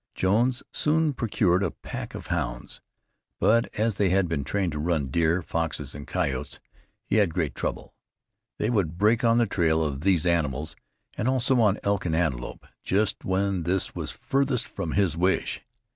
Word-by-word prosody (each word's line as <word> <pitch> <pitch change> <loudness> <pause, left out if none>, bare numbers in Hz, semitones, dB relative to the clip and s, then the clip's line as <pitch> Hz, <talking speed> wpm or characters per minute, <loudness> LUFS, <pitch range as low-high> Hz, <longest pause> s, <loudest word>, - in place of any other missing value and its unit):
Jones 120 +7 +2
soon 155 0 +2
procured 100 -7 +1
a - - +1
pack - - -7
of - - -7
hounds, - - -4 0.6
but 115 +1 +3
as 110 +1 +1
they 100 -1 +1
had 95 0 +2
been 80 -4 -2
trained 95 +5 -1
to 75 - -4
run 75 -4 0
deer, 85 +3 +2
foxes 80 -4 -3
and 70 +1 -9
coyotes 70 -8 -2 0.5
he 110 - +1
had 95 -7 +2
great 80 -6 0
trouble. - - -4 0.6
They 110 - 0
would 90 -8 0
break 110 +5 +3
on 115 0 +4
the 120 - +4
trail 80 -5 +1
of 70 -3 -3
these 90 -2 +2
animals, 80 -2 0 0.4
and 115 - -2
also 130 0 +2
on 105 -2 +3
elk 100 -1 0
and 80 - 0
antelope 65 -8 -2 0.2
just 105 +2 0
when 95 0 0
this 90 +3 0
was - - -4
farthest 135 -2 0
from 80 - -4
his 95 -6 +2
wish. 90 +3 0
95 Hz, 175 wpm, -26 LUFS, 80-105 Hz, 0.6 s, on